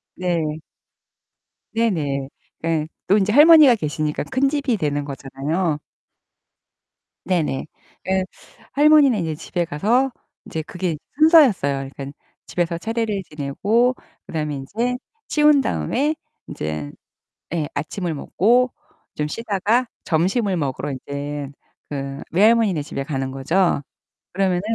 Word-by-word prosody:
네. 165 -4 -1 1.1
네네. 150 -12 0 0.3
그 160 -2 0 0.2
또 200 - +6
인제 210 0 +1
할머니가 300 -2 +8
계시니까 150 -5 -2
큰 260 - +1
집이 275 -5 0
되는 145 -4 -1
거잖아요. 145 +4 -2 1.5
네네. 165 -7 0 0.4
그 190 0 +1 0.5
할머니는 290 -5 +5
인제 160 -3 -2
집에 175 +3 -3
가서 225 - +1 0.3
이제 160 - -4
그게 175 -1 -3 0.2
순서였어요. 225 - +5
그러니까 140 +1 -8 0.3
집에서 170 -1 -1
차례를 220 +1 -2
지내고 200 - +1 0.3
그다음에 150 -2 -3
인제 225 - -2 0.3
치운 300 -2 +5
다음에 290 +3 0 0.3
인제 75 -1 -4 0.6
예 155 -4 -1
아침을 160 +4 -3
먹고 235 - +2 0.4
좀 150 0 -2
쉬다가 225 +5 0 0.2
점심을 190 +5 +1
먹으러 145 -2 -2
인제 140 +1 -5 0.4
그 140 -1 -5
외할머니네 210 -3 +4
집에 140 -1 -5
가는 135 -2 -3
거죠. 150 +5 +1 0.5
그러면은 185 -1 +1
175 Hz, 255 characters per minute, -21 LUFS, 145-230 Hz, 1.5 s, 할머니가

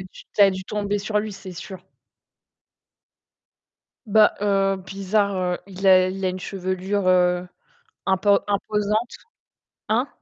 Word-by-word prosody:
dû 185 0 -12 0.2
tu - - -1
as 195 - +7
dû 190 0 -6
tomber 205 0 -2
sur 210 +1 -1
lui, 215 -1 -5
c'est 195 -1 -10
sûr. 185 +1 -9 2.3
Bah, 215 0 +5
heu, 195 -1 +2
bizarre, 195 +2 -1
heu, 180 -1 -1
il 195 0 -9
a 185 -1 +6
il 190 +1 -5
a - - +2
une 185 - -4
chevelure, 185 +1 -2
heu, 180 0 +2 0.6
impo 200 +1 +3
imposante. 210 +3 -1 0.7
Hein? 240 +6 +1
195 Hz, 135 wpm, -23 LUFS, 185-205 Hz, 2.3 s, as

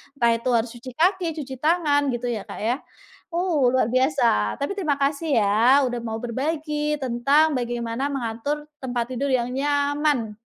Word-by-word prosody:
entah 235 -3 +3
itu 240 +2 -3
harus 230 +1 +1
cuci 245 +1 -10
kaki, 360 +1 +2 0.2
cuci 265 0 -7
tangan, 300 -3 +2
gitu, 240 +1 -4
ya, 215 -3 -3
Kak, - - -8
ya. 240 +4 +1 0.6
Oh, 340 -7 +2
luar 240 -3 +2
biasa. 255 - +2
Tapi 285 - -1
terima 310 -7 +1
kasih, 285 +1 0
ya, 230 +7 +4
udah 245 -1 -3
mau 225 -1 -4
berbagi 300 +4 -2
tentang 275 +6 +3
bagaimana 240 +2 -2
mengatur 275 +2 -3 0.2
tempat 245 -1 -3
tidur 275 +3 -2
yang 245 0 0
nyaman. 285 -3 0
265 Hz, 160 wpm, -23 LUFS, 235-295 Hz, 0.6 s, ya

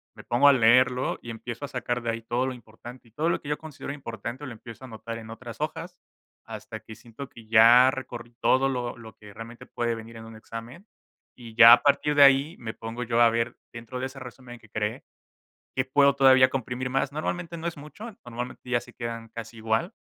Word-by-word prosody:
me - - -12
pongo 125 +4 +3
a 140 - +8
leerlo 125 +1 +3
y 120 - -10
empiezo 120 +4 -6
a - - -7
sacar 125 -2 -3
de 120 - -3
ahí 115 0 -5
todo 120 +3 -1
lo 130 - -3
importante, 120 +1 -13
y - - -31
todo 155 +8 -1
lo - - -1
que 145 - -8
yo 150 - 0
considero 145 -3 -8
importante 120 0 -7
lo 130 - -7
empiezo 115 +2 -12
a - - -10
anotar 115 0 -7
en 110 -1 -10
otras 115 0 -9
hojas 165 +3 -5 0.5
hasta - - -8
que 110 - -12
siento 120 +5 -11
que 115 -4 -15
ya 115 +3 +7
recorrí 120 -3 -8
todo 135 +1 +3
lo 125 -2 -3
lo 110 -2 -12
que 105 -1 -14
realmente 115 +3 -10
puede 120 -1 -2
venir 115 +1 -10
en 110 - -10
un 115 0 -11
examen. 115 - -10 0.5
Y 115 -3 -12
ya 115 0 +10
a 120 - +5
partir 145 +1 +2
de 145 - +8
ahí 140 +4 +5
me 110 -2 -6
pongo 115 +2 -6
yo 120 0 +1
a 120 - +7
ver 115 +1 -1 0.2
dentro 115 +2 -8
de 130 - -2
ese 135 0 -11
resumen 125 -1 -11
que 110 - -20
creé 105 +1 -3 0.7
qué 130 - 0
puedo 140 +1 +4
todavía 130 -1 +6
comprimir 130 0 -3
más. 135 +1 0
Normalmente 170 +2 -4
no 165 - -8
es 170 - -5
mucho, 150 +9 -10 0.2
normalmente 125 +1 -7
ya 120 -1 +1
se - - -15
quedan 115 -1 -6
casi 115 0 -9
igual, 110 0 -1
120 Hz, 225 wpm, -26 LUFS, 115-135 Hz, 0.7 s, ya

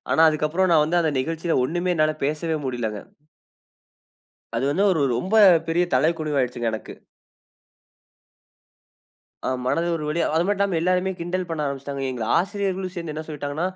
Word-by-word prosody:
ஆனா, - - +2
அதுக்கப்புறம் 155 +5 +1
நான் 150 -2 +5
வந்து 175 +3 +1
அந்த 160 -2 +1
நிகழ்ச்சில 165 +3 -1
ஒண்ணுமே 175 +5 -1
என்னால 155 -1 +2
பேசவே 155 +2 -1
முடியலங்க. 115 -5 -3 1.6
அது 115 - -1
வந்து 190 +7 +1
ஒரு 160 -5 +1 0.2
ரொம்ப 190 - -1 0.3
பெரிய 175 +2 +2
தலைகுனிவு 155 +1 +1
ஆகிடுச்சுங்க 120 -2 -1
எனக்கு. 110 - -6 2.5
ஆ - - +1 0.2
மனது 165 +6 +1
ஒரு 155 - -4
வலியா. 165 +1 0
அது 165 - +3
மட்டுமில்லாம 200 -4 +1
எல்லோருமே 185 +2 +1
கிண்டல் 180 +1 -3
பண்ண 160 -2 -2
ஆரம்பிச்சிட்டாங்க. 140 0 -4
எங்கள 120 -3 -4
ஆசிரியர்களும் 190 0 -2
சேர்ந்து 170 -3 -5
என்ன 155 - -4
சொல்லிட்டாங்கன்னா, 150 +3 -3
160 Hz, 145 wpm, -23 LUFS, 145-180 Hz, 2.5 s, நான்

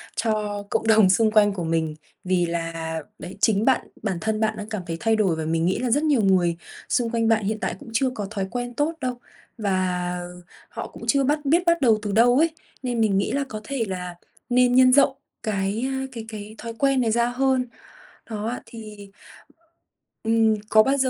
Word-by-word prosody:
cho 210 -2 -1
cộng 225 - -1
đồng 215 -4 +6
xung 215 +3 +3
quanh 205 -2 +4
của 180 - -4
mình. 160 -1 -1 0.3
Vì 180 -1 +1
là, 165 -1 -3 0.2
đấy, 190 +3 -9
chính 215 0 +3
bạn, 265 - +2 0.2
bản 195 -5 -1
thân 220 -1 -1
bạn 220 0 0
đang 210 0 -7
cảm 215 -4 -3
thấy 165 - -3
thay 225 0 +2
đổi 195 -6 +2
và 160 0 -4
mình 165 +1 0
nghĩ 185 - +1
là 250 - -1
rất 290 +6 +2
nhiều 285 -7 +3
người 180 -4 +3 0.3
xung 235 -2 +1
quanh 230 -1 0
bạn 225 -2 +3
hiện 215 +1 -1
tại - - -2
cũng 285 -4 -12
chưa 260 +2 +2
có 205 - -3
thói 195 -3 -2
quen 245 0 -4
tốt 295 +6 0
đâu. 250 -2 -3 0.4
Và 180 -4 -1 0.5
họ - - -6
cũng - - -13
chưa 275 -1 +3
bắt 295 +3 +1
biết 330 +6 +3
bắt 335 -2 +3
đầu 225 -4 +4
từ 205 -2 -3
đâu 240 +4 +5
ấy, 330 +2 +4 0.3
nên 245 -2 -1
mình 205 -3 +2
nghĩ 195 - 0
là 280 0 0
có 215 0 -6
thể 260 -1 -2
là 180 -2 -5 0.3
nên 250 0 +4
nhân 255 0 +7
rộng 280 -1 +4 0.3
cái 200 +1 -1
a, 265 0 -2
cái 230 -3 -7
cái 215 0 -8
thói 230 -1 -6
quen 275 -2 +3
này 225 -2 +1
ra 235 +1 +2
hơn. 260 0 +1 0.6
Đó 215 -1 -4
ạ, 245 - -5
thì, 210 -3 -11 1.1
ừm, 225 -1 +3
có 215 0 +6
bao 270 +3 +1
giờ 260 -1 +2
220 Hz, 215 wpm, -24 LUFS, 195-250 Hz, 1.1 s, nhân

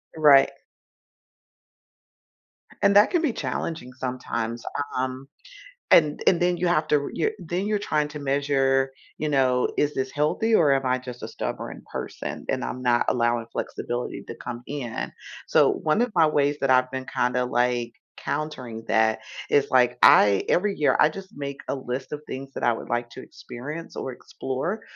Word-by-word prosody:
Right. 145 -3 +6 2.3
And 200 - +4
that 205 +1 +6
can 350 -2 +2
be 300 -7 0
challenging 130 - -4
sometimes. 120 -2 -4 0.3
Um, 130 +1 -3 0.6
and 150 -3 +5
and 175 - +5
then 175 0 +2
you 180 - 0
have 170 -2 +2
to 145 -1 +2
you're 435 - 0
then 175 +4 -3
you're 210 0 0
trying 150 -6 0
to 150 0 -7
measure, 135 -1 +1 0.3
you 155 - -2
know, 130 -3 +2
"Is 145 0 0
this 130 0 -2
healthy, 155 +10 0
or 160 -9 +5
am 135 -1 +1
I 130 0 +1
just 125 -1 -9
a - - -4
stubborn - - -5
person, - - -6
and - - -1
I'm 125 - -5
not 120 -1 +3
allowing 120 -1 +1
flexibility 120 +1 -4
to - - -7
come 120 -1 -7
in." 130 -6 -4 0.4
So, - - +5
one 155 +8 0
of 245 - -2
my 165 -3 +5
ways 145 -1 +1
that 135 - +1
I've 130 0 +4
been 130 -1 -4
kinda, 125 0 0
like, 120 -1 0 0.2
countering 130 -7 -4
that 110 0 +2 0.3
is, 145 - +3
like, 125 -1 +4
I 100 -1 +7
every 200 +2 +2
year, 150 - +3
I 150 - +6
just 190 +4 -10
make 140 -1 -6
a - - -1
list 130 0 -5
of 150 - -5
things 135 +1 -7
that - - -6
I 120 - +4
would 115 - -8
like 120 0 -1
to - - -9
experience, 150 +7 -8
or 130 - -4
explore, 135 - -4
135 Hz, 175 wpm, -25 LUFS, 125-155 Hz, 2.3 s, I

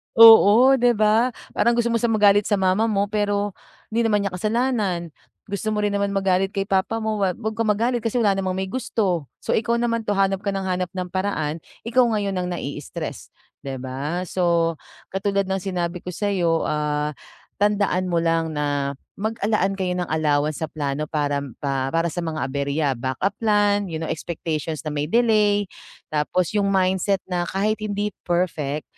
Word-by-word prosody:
Oo 230 +3 +8
'di 240 -1 +4
ba? 215 +3 +3 0.2
Parang 235 0 +2
gusto 235 0 +1
mo 230 - +1
siya 235 - +1
magalit 205 -2 +4
sa 205 - +2
mama 190 +3 +2
mo 200 -2 +1
pero, 205 -1 0 0.4
di 230 - 0
naman 210 -3 +2
niya 200 - -2
kasalanan. 210 - -1 0.3
Gusto 215 +2 -3
mo 210 - 0
rin 205 - +1
naman 200 0 -1
magalit 195 0 +1
kay 195 - +1
papa 195 +3 0
mo, 215 -1 -1
wag 185 -3 +1 0.2
kang 230 0 -1
magalit 235 +4 +1
kasi 230 +1 -3
wala 205 - +4
namang 190 -1 -1
may 190 0 -2
gusto. 205 - -1 0.2
So - - -2
ikaw 230 +2 +1
naman 230 -2 -1
'to 205 - +1
hanap 195 -1 +2
ka 200 0 -3
ng 195 - -2
hanap 185 -1 -1
ng 180 -1 -4
paraan 170 -5 -2 0.2
ikaw 240 +2 +3
ngayon 200 -2 -1
ang 180 - -2
na-i-istress 150 -5 -5 0.3
'di 135 -1 -6
ba? 135 +7 -4
So 170 -3 +1 0.3
katulad 195 0 -1
ng 190 - 0
sinabi 180 -2 -3
ko 180 0 -7
sayo, 175 -5 +1
ah, 150 0 -1 0.5
tandaan 200 -3 +1
mo 170 - +2
lang 165 -1 +1
na 145 -2 -1 0.2
mag, 215 +3 -2
ah, 205 - -1
laan 195 -2 +1
kayo 180 -1 -1
ng 180 -1 -3
allowance 150 -1 +1
sa 160 - -1
plano 150 0 -3
para 145 -2 0 0.2
pa 135 -2 0
para 165 +2 0
sa 175 - -4
mga 160 -2 -3
aberya 140 +2 -1
backup 130 +10 -1
plan 205 -2 +2
you 165 - -5
know 160 0 -3
expectations 155 -2 -4
na 155 - -3
may 150 0 -2
delay. 210 -1 +3 0.5
Tapos 155 +3 0
yung 205 -1 +1
mindset 190 0 +1
na 175 -1 -1
kahit 215 +3 0
hindi 210 -1 -2 0.2
perfect 155 -5 -1
190 Hz, 180 wpm, -23 LUFS, 165-210 Hz, 0.5 s, Oo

